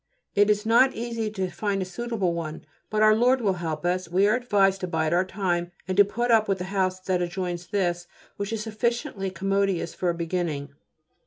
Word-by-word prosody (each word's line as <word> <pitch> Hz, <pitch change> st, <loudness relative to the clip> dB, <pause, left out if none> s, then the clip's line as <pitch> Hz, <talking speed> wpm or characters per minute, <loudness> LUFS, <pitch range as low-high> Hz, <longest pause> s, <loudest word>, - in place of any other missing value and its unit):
It 205 Hz, +1 st, +4 dB
is 210 Hz, +1 st, +2 dB
not 240 Hz, +4 st, +4 dB
easy 230 Hz, -1 st, -3 dB
to 190 Hz, -3 st, -2 dB
find 200 Hz, -2 st, -1 dB
a 190 Hz, -, -1 dB
suitable 205 Hz, -2 st, -2 dB
one, 160 Hz, -2 st, -5 dB, 0.2 s
but 215 Hz, 0 st, +2 dB
Our 215 Hz, 0 st, +7 dB
Lord 250 Hz, +3 st, +3 dB
will 205 Hz, -5 st, +1 dB
help 160 Hz, -1 st, -3 dB
us. 180 Hz, 0 st, 0 dB
We 185 Hz, +3 st, +3 dB
are 215 Hz, -, +3 dB
advised 200 Hz, -6 st, +2 dB
to 185 Hz, -, -2 dB
bide 160 Hz, -1 st, 0 dB
our 175 Hz, +2 st, +3 dB
time 180 Hz, -3 st, -2 dB, 0.2 s
and 185 Hz, -, -1 dB
to 205 Hz, -, +8 dB
put 240 Hz, +4 st, -1 dB
up 220 Hz, -1 st, +4 dB
with 195 Hz, -1 st, +1 dB
the 180 Hz, -, -4 dB
house 185 Hz, -1 st, 0 dB
that 185 Hz, -1 st, 0 dB
adjoins 175 Hz, -1 st, -3 dB
this, 175 Hz, -3 st, -1 dB, 0.3 s
which 200 Hz, +1 st, -4 dB
is 220 Hz, -1 st, -2 dB
sufficiently 220 Hz, -3 st, -2 dB
commodious 195 Hz, -1 st, 0 dB
for 180 Hz, -, -1 dB
a 170 Hz, -, 0 dB
beginning. 165 Hz, -4 st, -3 dB
195 Hz, 210 wpm, -25 LUFS, 175-215 Hz, 0.3 s, to